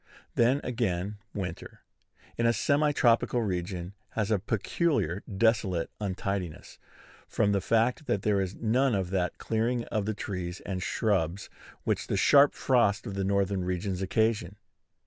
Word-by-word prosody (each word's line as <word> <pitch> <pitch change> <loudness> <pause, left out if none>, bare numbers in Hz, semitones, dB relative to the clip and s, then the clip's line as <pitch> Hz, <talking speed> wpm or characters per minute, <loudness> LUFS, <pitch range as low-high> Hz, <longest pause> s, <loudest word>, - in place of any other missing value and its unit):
Then, 125 +4 +3
again, 105 -4 -2
winter, 90 -4 -6 0.5
in 115 - +1
a 115 - +4
semi 145 +6 +2
tropical 120 -2 +2
region, 90 -1 -3 0.2
has 110 -1 -1
a 105 - +3
peculiar 105 - 0
desolate 100 -5 +1
untidiness, 95 -4 -4 0.5
from 100 - +1
the 100 -1 +1
fact 115 +8 +1
that 100 - 0
there 100 -2 +2
is 95 0 -3
none 120 +2 +2
of 95 -2 -2
that 90 -2 -1
clearing 115 +2 0
of 105 -2 -1
the 110 - -1
trees 90 -3 -4
and 95 -2 -3
shrubs 95 -3 -1 0.3
which - - -1
the - - -1
sharp 145 0 +6
frosts 120 -6 +2
of 100 - -5
the 100 0 -2
northern 100 -1 +1
regions 90 +1 -2
occasion. 105 -1 0
100 Hz, 145 wpm, -28 LUFS, 95-115 Hz, 0.5 s, sharp